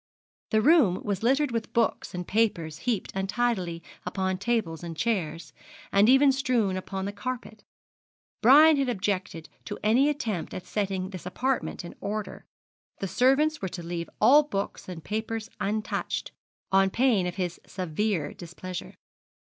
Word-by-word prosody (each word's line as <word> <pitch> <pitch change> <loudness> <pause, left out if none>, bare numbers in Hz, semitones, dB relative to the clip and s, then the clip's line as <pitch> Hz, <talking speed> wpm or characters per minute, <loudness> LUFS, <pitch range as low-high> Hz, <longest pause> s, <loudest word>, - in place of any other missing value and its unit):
The 215 0 +2
room 275 - +5
was 200 -2 -2
littered 270 +4 +2
with 230 -2 -3
books 230 -5 0
and 180 0 -5
papers 170 -8 0
heaped 220 -6 -1
untidily 190 -4 -1 0.2
upon 190 0 -2
tables 200 -7 -1
and 165 -2 -6
chairs, 165 -8 -2 0.4
and 200 +3 +5
even 270 +2 +6
strewn 250 -7 +1
upon 190 +1 -4
the 200 - -2
carpet. 235 -2 -6 0.8
Brian 300 +5 +8
had 275 -2 +1
objected 185 -6 -2 0.2
to 205 - -5
any 245 +7 +4
attempt 225 - -3
at 185 - -6
setting 195 -2 -2
this 185 -2 -7
apartment 250 -2 -2
in 170 - -8
order 210 +1 -4 0.5
the 195 - -3
servants 270 - +2
were 190 - -2
to 175 - -7
leave 170 0 -4
all 270 +7 +7
books 200 -10 -4
and 165 -3 -7
papers 220 +1 -4
untouched, 210 +1 -2 0.4
on 195 0 +4
pain 225 -4 +2
of 180 - -4
his 180 -3 -3
severe 185 -2 -2
displeasure. 180 0 -8
205 Hz, 150 wpm, -27 LUFS, 180-240 Hz, 0.8 s, Brian